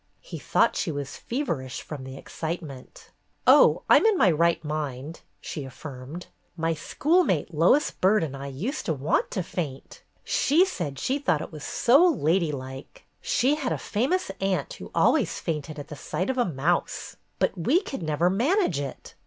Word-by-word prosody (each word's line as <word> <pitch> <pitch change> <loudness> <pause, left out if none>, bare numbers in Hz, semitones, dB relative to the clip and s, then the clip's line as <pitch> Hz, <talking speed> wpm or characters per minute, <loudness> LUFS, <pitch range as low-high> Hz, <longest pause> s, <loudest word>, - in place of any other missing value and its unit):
He - - -8
thought - - +2
she 165 - -1
was 140 -2 -5
feverish 145 - -3
from 145 -4 -7
the 130 0 -8
excitement. 155 -4 -7 0.3
"Oh, - - +6
I'm - - +6
in 430 -4 +3
my 190 - +5
right 170 +1 +2
mind," 150 0 -4 0.2
she 150 - -6
affirmed. 135 +4 -8 0.3
"My 165 0 0
schoolmate, 230 - +1
Lois 175 - +4
Byrd, 195 0 +2
and 140 -4 -4
I 135 +1 -6
used 195 - -4
to 160 - +1
want 140 +3 0
to 185 - -2
faint. 150 -6 -6 0.2
She 330 +7 +3
said 170 - -4
she 270 - -1
thought 180 - +1
it - - -9
was 155 -2 -9
so 270 +8 +4
'ladylike.' 150 - -1 0.2
She 260 +4 +2
had 290 -4 -2
a - - 0
famous 260 - -1
aunt 185 -7 -1
who - - -10
always - - +3
fainted 155 -1 -4
at 145 - -8
the 150 - -7
sight 185 - -2
of 260 - -6
a 245 - +3
mouse. 165 +1 -1 0.2
But - - +1
we 245 - +2
could 285 - -6
never 155 +2 +1
manage 255 - +2
it. 140 -2 -7
165 Hz, 170 wpm, -26 LUFS, -, 0.3 s, Oh